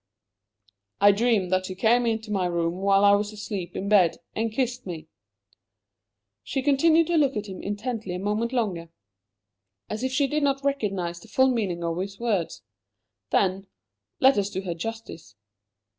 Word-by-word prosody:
"I 205 +1 +7
dreamed 205 -3 +1
that 185 0 0
you 185 - -5
came 235 +4 +3
into 220 -1 -2
my 190 -3 +1
room 170 0 -1
while 195 +1 +3
I 200 - +7
was 205 +1 +1
asleep 205 -4 -6
in 195 - -3
bed, 195 -5 +4 0.2
and 225 0 -1
kissed 250 -1 -2
me!" 160 -3 -7 1.3
She 270 - -3
continued 315 +4 +4
to 340 +1 +1
look 280 -4 +2
at 210 - -3
him 190 -3 -8
intently 205 -2 -4
a - - -4
moment 210 +4 -1
longer, 195 -10 -2 1.0
as 215 +1 -3
if 260 0 -1
she 275 +2 +2
did 300 +3 -1
not 275 -1 0
realize 195 -11 -1
the - - -16
full 260 0 +3
meaning 190 -8 -2
of 170 +1 -2
his 195 +1 -5
words. 210 -8 -2 0.7
Then 195 0 +1 0.5
let 265 -4 +5
us 200 0 -1
do 190 - -4
her 180 -2 -3
justice! 195 - -7
205 Hz, 170 wpm, -25 LUFS, 185-245 Hz, 1.3 s, I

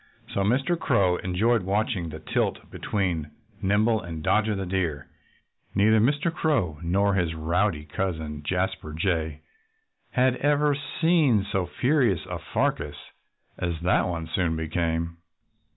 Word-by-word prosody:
So - - -1
Mr. 135 - +1
Crow 95 - +2
enjoyed 105 +6 +1
watching 95 -2 -1
the 80 - -7
tilt 80 - -2
between 90 -7 -2 0.3
Nimble 105 +3 +2
and 80 -2 -7
Dodger 110 +3 +2
the 95 -1 -3
Deer. 85 -6 -1 0.7
Neither 110 +2 +5
Mr. 145 +8 +2
Crow, 115 - 0
nor 100 +4 +2
his 85 -4 0
rowdy 80 0 0
cousin 80 -3 -3
Jasper 90 0 -2
Jay, 80 -2 -1 0.7
had 130 0 +2
ever 145 0 +2
seen 145 - +2
so 95 -2 0
furious 125 - +1
a - - -5
fracas - - -1 0.6
as 85 -2 -2
that 90 +2 +2
one 85 -2 -3
soon 85 -3 +1
became. 80 +1 -2
95 Hz, 130 wpm, -26 LUFS, 85-115 Hz, 0.7 s, Neither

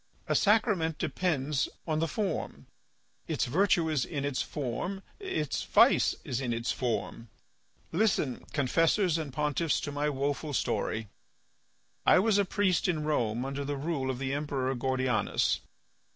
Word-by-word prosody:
A - - +1
sacrament 205 -7 +2
depends 150 -6 0 0.2
on 155 -2 0
the 165 - +1
form; 200 +3 -3 0.6
its - - 0
virtue 170 +4 +2
is 155 -5 +1
in 140 -1 -3
its 140 -2 -1
form; 155 +8 -4 0.2
its 270 - -2
vice - - +4
is 125 0 -2
in 120 -3 -1
its 115 +1 -1
form. 120 -2 -3 0.6
Listen, 170 - +1
confessors 165 +5 +2
and 150 -3 -4
pontiffs, 150 +3 0
to 145 - -4
my 145 +1 0
woeful 145 +1 -2
story. 110 -4 -1 1.0
I - - +6
was 205 +2 +3
a 200 - +3
priest 190 -1 +1
in 160 -4 0
Rome 125 -5 0
under 135 +1 -3
the 145 0 -3
rule 140 -2 -2
of 130 - -2
the 135 +1 -2
Emperor 140 -3 -1
Gordianus. 130 -1 +1
145 Hz, 145 wpm, -30 LUFS, 130-170 Hz, 1.0 s, I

